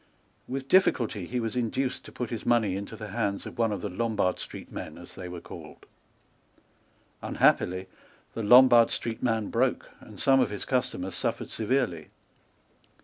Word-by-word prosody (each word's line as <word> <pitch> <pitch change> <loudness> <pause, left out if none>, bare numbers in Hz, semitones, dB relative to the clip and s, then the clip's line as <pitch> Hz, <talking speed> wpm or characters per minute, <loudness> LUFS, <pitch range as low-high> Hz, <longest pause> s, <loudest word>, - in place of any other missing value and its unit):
With 135 +1 -4
difficulty 115 - +2
he 125 - -2
was 115 -1 -3
induced 125 +2 -1
to - - -11
put 125 -3 -5
his 115 - -4
money 115 -6 +2
into 100 +3 -6
the 110 -1 -8
hands 100 +1 -2
of - - -9
one 115 -2 +2
of 100 -3 -3
the 105 - -3
Lombard 100 -1 0
Street - - -8
men, - - -7
as - - -11
they 90 - -7
were 90 -1 -6
called. - - -11 1.4
Unhappily, 95 +1 +2 0.5
the 115 - -4
Lombard 120 +1 +7
Street 115 -1 -3
man 115 -4 0
broke, 125 +2 0
and 105 -3 -13
some 135 -1 +4
of - - +2
his 105 - -5
customers 125 -8 -1
suffered - - -2
severely. 110 - -1
115 Hz, 165 wpm, -28 LUFS, 100-125 Hz, 1.4 s, Lombard